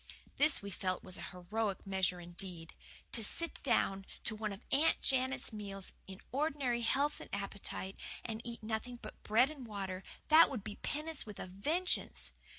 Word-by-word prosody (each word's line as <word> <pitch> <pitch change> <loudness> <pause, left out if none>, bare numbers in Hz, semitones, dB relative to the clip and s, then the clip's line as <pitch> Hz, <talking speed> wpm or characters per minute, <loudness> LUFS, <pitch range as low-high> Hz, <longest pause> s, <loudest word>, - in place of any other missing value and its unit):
This, 305 -6 +5
we 200 - -5
felt, 185 -1 -1
was 185 - -6
a - - -5
heroic 195 +3 -2
measure 190 -2 +1
indeed. 175 -1 -4 0.4
To 225 - +3
sit 335 +10 0
down 195 -7 +2 0.2
to 215 - +4
one 215 -1 -2
of 200 +3 -8
Aunt 305 +4 +4
Janet's 260 -2 +2
meals, 200 -2 -5
in 190 0 -8
ordinary 275 -4 +1
health 280 +5 +2
and - - -9
appetite, 200 -1 -3 0.3
and 225 -1 -3
eat 235 -2 -6
nothing 220 +3 -2
but 215 - -10
bread 240 +7 +4
and 285 -4 -8
water 190 -3 -3 0.3
that 315 +2 +9
would 245 -8 -4
be 205 - -5
penance 305 -3 -1
with 210 - -7
a - - -3
vengeance! 300 - +1
215 Hz, 170 wpm, -35 LUFS, 195-270 Hz, 0.4 s, that